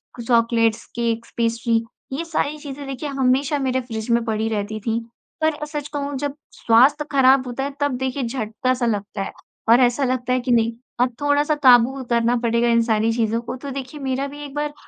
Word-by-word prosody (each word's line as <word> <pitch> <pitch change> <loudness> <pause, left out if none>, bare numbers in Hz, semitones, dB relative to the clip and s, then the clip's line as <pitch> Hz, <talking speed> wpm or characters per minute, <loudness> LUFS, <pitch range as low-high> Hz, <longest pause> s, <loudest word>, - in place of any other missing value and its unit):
कु 240 - -7
chocolates, 230 -1 +2
cakes, 230 -1 -2
pastry, 230 0 +1 0.3
ये 310 +5 -2
सारी 305 -2 -1
चीज़ें 285 -1 -8
देखिए 275 +2 -4
हमेशा 270 +2 +1
मेरे 260 -1 0
फ़्रिज 225 -2 -6
में 235 0 +3
पड़ी 220 -1 -1
रहती 215 0 -3
थीं। 230 -1 0 0.4
पर 315 0 +3
अ, 300 0 -6
सच 295 -1 -5
कहूँ 285 -1 -3
जब 285 0 -3 0.2
स्वास्थ्य 270 +6 +4
ख़राब 265 -1 +5
होता 250 +2 -3
है 280 0 -4
तब 285 -3 +1
देखिए 260 +1 -2
झटका 240 +2 -1
सा 250 -1 -1
लगता 205 -2 -2
है, - - -4 0.4
और 235 +2 +7
ऐसा 245 +3 +3
लगता 255 -1 0
है 255 - +2
कि 250 0 -2
नहीं, 230 -1 +3 0.3
अब 250 0 +2
थोड़ा-सा 290 +1 +2
काबू 255 +1 +5
करना 235 0 +2
पड़ेगा 235 0 +2
इन 230 0 +4
सारी 225 0 +1
चीज़ों 225 -1 0
को। 235 - -6
तो 280 +2 -7
देखिए, 270 +2 -6
मेरा 270 +1 -1
भी 290 +1 -9
एक 280 - -10
बार 295 0 -2
255 Hz, 205 wpm, -22 LUFS, 230-280 Hz, 0.4 s, और